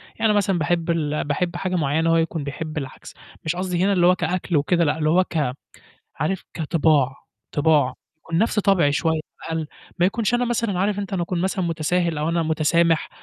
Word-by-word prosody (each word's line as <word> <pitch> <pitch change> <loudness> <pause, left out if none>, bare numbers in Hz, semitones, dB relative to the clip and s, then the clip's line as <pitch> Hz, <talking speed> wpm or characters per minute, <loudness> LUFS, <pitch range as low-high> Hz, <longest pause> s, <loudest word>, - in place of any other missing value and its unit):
يعني 225 - -2
أنا - - +2
مثلًا 195 -3 +1
باحب 165 +2 0
ال 150 -3 0
باحب 170 +5 -2
حاجة 185 +1 -2
معيّنة 160 0 +1
هو 165 - +4
يكون 165 -1 -1
بيحب 155 +2 -5
العكس، 135 -3 -7 0.3
مش 160 +2 0
قصدي 180 -1 -1
هنا 200 +1 +3
اللي 175 -2 +4
هو 180 - +5
كأكل 180 -1 -1
وكده 170 +4 +2
لأ، 150 0 +1
اللي 155 -1 +1
هو 180 +4 +4
ك 150 -8 -1 0.6
عارف 190 +4 -2
كطباع، 155 -4 +2 0.4
طباع، 145 -4 +3 0.2
يكون 165 +1 -3
نفْس 220 +1 +1
طبعي 190 -8 +3
شوية 160 +2 +1
أو 155 - -13
أقل، 160 - -3 0.3
ما 175 - +4
يكونش 225 +3 0
أنا 245 +1 +2
مثلًا 230 -5 -1
عارف 200 +2 0
أنت 200 0 -5
أنا 185 -3 0
أكون 170 0 -2
مثلًا 190 0 -1
متساهل 165 0 0
أو 150 - -1
أنا 170 0 +1
متسامح 160 +1 +2
170 Hz, 205 wpm, -22 LUFS, 155-185 Hz, 0.6 s, هو